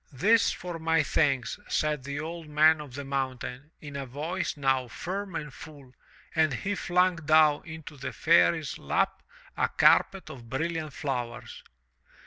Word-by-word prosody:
"This 205 - +3
for 175 -2 -6
my 160 -1 +2
thanks,*' 135 -5 0
said 150 -3 0
the 140 0 -4
Old 165 +1 -6
Man 155 +1 +4
of 140 -4 -10
the 140 0 -6
Mountain, 135 0 -4
in 145 -2 -9
a 140 -1 -4
voice 160 +7 -3
now 135 -2 +1
firm 190 +8 -5
and 150 -3 -5
full, 140 -5 -12 0.4
and 160 -2 +3
he 200 +11 -2
flung 180 -1 +2
down 155 -1 +4
into 160 -2 -9
the 135 - -5
Fairy's - - +3
lap - - 0 0.3
a - - +1
carpet 195 -1 +3
of 120 -3 -11
brilliant 160 +3 -3
flowers. 120 -6 -4
150 Hz, 150 wpm, -28 LUFS, 135-165 Hz, 0.4 s, Man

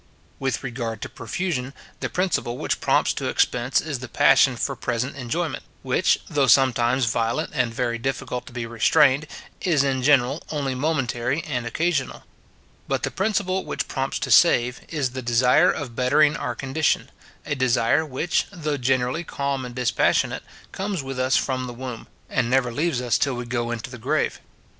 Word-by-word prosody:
With 130 -3 -2
regard 120 -4 -4
to - - -5
profusion, 135 - -3 0.2
the - - -3
principle 180 -10 -1
which - - -2
prompts - - +2
to - - -3
expense 125 +2 +1
is 150 -5 -4
the 130 - -7
passion 125 +2 +4
for 135 +3 -2
present 125 +3 -2
enjoyment; 150 +6 -3 0.2
which, - - +2
though 140 -2 +1
sometimes 125 0 +4
violent 115 +1 -1
and 115 - +1
very 115 0 -2
difficult 125 -1 -3
to - - -10
be 120 -1 -4
restrained, 130 +5 +3 0.3
is 155 -7 +2
in 135 -2 0
general 135 +1 +3
only 140 -4 -2
momentary 130 -1 -1
and 125 -6 -3
occasional. 155 +1 -1 0.6
But - - -1
the - - -1
principle 190 -2 0
which - - -3
prompts 135 0 -2
to - - -2
save, 125 -7 +5
is 145 -6 -1
the 130 +1 -5
desire 125 +7 +4
of 130 -6 -3
bettering 145 +4 +3
our 120 -4 -3
condition; 135 +5 0 0.3
a 150 - -1
desire 130 +1 +2
which, 155 +4 -1
though 155 -6 -3
generally 130 +4 0
calm 140 -4 -2
and 120 -1 -8
dispassionate, 125 -2 +1 0.3
comes 195 -5 -3
with 135 -1 -5
us 130 +1 +3
from 130 -1 -1
the 120 - -6
womb, 125 -1 -7 0.2
and 120 -2 0
never 125 -1 +2
leaves 145 -2 0
us 120 -3 +1
till 135 -3 +1
we 120 0 -5
go 120 -1 -2
into 120 0 -5
the 125 - -9
grave. 140 +6 -1
130 Hz, 170 wpm, -23 LUFS, 120-145 Hz, 0.6 s, save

